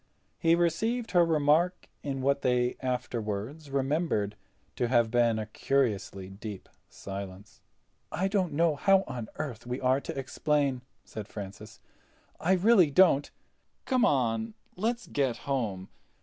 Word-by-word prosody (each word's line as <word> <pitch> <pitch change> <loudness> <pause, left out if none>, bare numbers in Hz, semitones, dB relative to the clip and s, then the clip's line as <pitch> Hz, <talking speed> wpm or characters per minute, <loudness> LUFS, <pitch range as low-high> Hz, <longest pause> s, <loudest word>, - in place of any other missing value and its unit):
He 165 0 +4
received 220 +8 0
her 175 -2 +5
remark 165 +3 +2
in 135 -2 -4
what 140 +1 +2
they 125 -1 +1
afterward 125 +2 -3
remembered 135 - 0 0.4
to 120 - 0
have 120 -2 +3
been 120 -2 +3
a 110 - -3
curiously 105 -5 -1
deep 100 +1 -8 0.2
silence. 100 0 -8 0.5
"I 185 +4 0
don't 195 -3 0
know 165 0 +2
how 195 +5 +4
on 120 -3 -6
earth 120 -6 -5
we 125 +1 -3
are 130 +1 +2
to - - -6
explain," 140 0 0 0.2
said 105 -2 -7
Francis. 105 +1 -9 0.6
"I 180 +4 +2
really 190 -3 +5
don't. 145 -3 +4 0.6
Come 255 -3 +2
on—let's 125 - -1
get 130 -5 -1
home. 110 -9 -2
135 Hz, 130 wpm, -29 LUFS, 110-165 Hz, 0.6 s, her